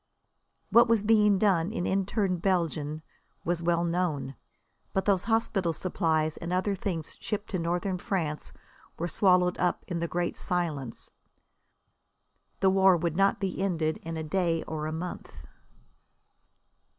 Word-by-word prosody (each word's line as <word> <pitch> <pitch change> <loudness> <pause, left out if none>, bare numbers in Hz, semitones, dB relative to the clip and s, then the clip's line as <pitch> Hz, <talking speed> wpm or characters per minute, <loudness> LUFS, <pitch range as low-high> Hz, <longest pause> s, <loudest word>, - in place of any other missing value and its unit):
What 235 +1 +7
was 230 -3 +3
being 210 -2 +4
done 185 -3 +2
in 180 - -2
interned 195 -1 0
Belgium 160 -5 -1 0.4
was 170 0 0
well 170 0 +1
known. 170 -6 -1 0.6
But 190 - 0
those 195 -3 +2
hospital 220 -6 +1
supplies 160 -2 0
and 170 - -5
other 185 +3 +1
things 180 -5 -4
shipped 210 0 -4
to 185 - -1
Northern 175 +2 -1
France 160 -6 -2 0.5
were 170 - -2
swallowed 180 0 +3
up 180 - 0
in 175 -2 -3
the 170 - -1
great 175 +1 -2
silence. 155 -9 -3 1.5
The 190 -1 +5
war 190 -1 +5
would 170 -1 -1
not 195 +2 +3
be 190 -1 -2
ended 165 -5 0
in 165 0 -5
a 160 - -3
day 165 0 0
or 155 -1 -4
a - - -3
month. 170 +3 -6
175 Hz, 140 wpm, -28 LUFS, 165-195 Hz, 1.5 s, What